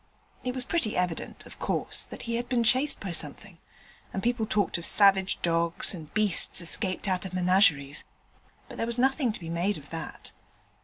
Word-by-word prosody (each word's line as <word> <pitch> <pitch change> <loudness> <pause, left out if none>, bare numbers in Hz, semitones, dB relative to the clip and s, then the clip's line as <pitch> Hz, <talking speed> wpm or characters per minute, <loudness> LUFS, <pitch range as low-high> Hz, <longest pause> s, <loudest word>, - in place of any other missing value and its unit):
It 250 0 -3
was 255 - -2
pretty 290 -11 0
evident, 180 -2 -3
of - - -13
course, - - 0
that - - -10
he 230 0 -2
had 240 +1 -5
been 245 -2 +1
chased 260 +6 +4
by 195 - -5
something, 170 +3 -1 0.5
and 190 - -4
people 235 -2 0
talked 205 -4 0
of 170 - -7
savage 195 -2 +4
dogs, 170 +1 0
and 160 -4 -9
beasts 210 -4 +3
escaped 185 +3 -1
out 185 -1 0
of 185 -1 -6
menageries; 180 -6 +3 0.6
but - - -11
there 230 - -1
was 235 0 0
nothing 265 0 +2
to - - -6
be 165 -2 -7
made 180 +5 -1
of 145 -1 -14
that. 165 -1 -7
195 Hz, 190 wpm, -27 LUFS, 170-230 Hz, 0.6 s, chased